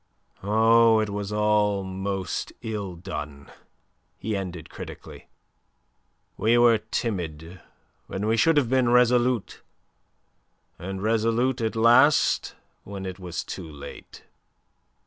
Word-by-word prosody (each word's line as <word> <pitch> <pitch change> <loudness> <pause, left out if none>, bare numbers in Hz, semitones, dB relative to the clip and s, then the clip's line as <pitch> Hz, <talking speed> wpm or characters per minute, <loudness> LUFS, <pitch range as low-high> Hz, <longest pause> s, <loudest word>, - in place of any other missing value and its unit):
"Oh, 115 +2 +4
it 105 -1 -1
was 100 0 -4
all 105 -1 +1
most 95 0 -4
ill 105 -5 -4
done," 75 -4 -8 0.7
he 110 +1 -3
ended 90 -4 -5
critically. - - -10 1.1
"We 115 +2 +3
were 120 -2 +5
timid 90 -6 -4 0.5
when 100 +2 -4
we 110 +1 +2
should 155 +7 +3
have 140 -5 +3
been 130 -1 +2
resolute, 125 -1 +2 1.2
and 95 +2 -6
resolute 115 +3 +1
at 110 0 -1
last 120 +6 +4 0.3
when 100 -1 -7
it 95 0 -6
was 90 -2 -5
too 85 -4 -8
late. 70 -1 -11
105 Hz, 110 wpm, -25 LUFS, 95-115 Hz, 1.2 s, were